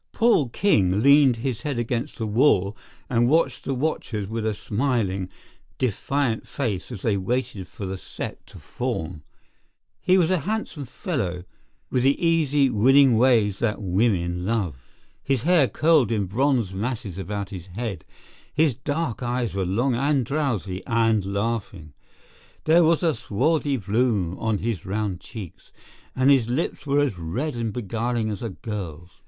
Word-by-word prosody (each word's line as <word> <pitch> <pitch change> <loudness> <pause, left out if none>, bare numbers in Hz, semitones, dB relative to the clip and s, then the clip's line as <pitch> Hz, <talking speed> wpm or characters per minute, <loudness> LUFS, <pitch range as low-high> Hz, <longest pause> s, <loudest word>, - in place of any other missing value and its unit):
Paul 225 - +3
King 105 - +2
leaned 140 -2 +6
his 120 0 -3
head 145 -4 -3
against 120 +4 -2
the 115 - -2
wall 105 -3 +3 0.3
and 120 -1 +2
watched 160 +3 +2
the 135 - -1
watchers 125 -7 -2
with 110 +1 -3
a 110 - -1
smiling, 100 -5 -1 0.5
defiant 125 0 -1
face 120 -5 -3
as 110 -6 -7
they 105 -3 +1
waited 115 -1 -2
for 100 - -7
the 95 0 -4
set - - -7
to - - -13
form. 80 0 -4 0.8
He 185 +1 +4
was 175 -1 +3
a 185 - +2
handsome 195 -6 -3
fellow, 120 - -3 0.5
with 125 - +2
the 135 +2 +3
easy, 150 -5 +3
winning 130 +3 +5
ways 110 -5 +3
that 115 -3 0
women 90 -3 0
love. 100 -7 -1 0.5
His 135 -4 -1
hair 170 -5 +4
curled 150 -6 +3
in 105 -3 +1
bronze 120 0 +1
masses 100 -3 -4
about 100 +1 -4
his 90 -2 -8
head; 100 -2 -5 0.5
his 155 -2 +2
dark 145 0 -3
eyes 120 -2 -1
were 95 -2 -1
long 120 +8 +1
and 135 +1 +1
drowsy 115 - -2
and 115 -3 +2
laughing; 100 -7 -3 0.7
there 165 +2 +5
was 165 +1 +3
a 165 -2 +3
swarthy 145 +6 0
bloom 100 -4 0
on 110 -2 0
his 110 -4 -3
round 100 -2 -2
cheeks; 105 -7 -10 0.4
and 130 +2 +4
his 125 -5 +3
lips 145 +3 -2
were 140 +1 +3
as 130 -11 -1
red 120 - -3
and 115 -2 -2
beguiling 115 0 -2
as 100 - -5
a 115 - -3
girl's. 90 -4 -7
115 Hz, 155 wpm, -24 LUFS, 100-140 Hz, 0.8 s, leaned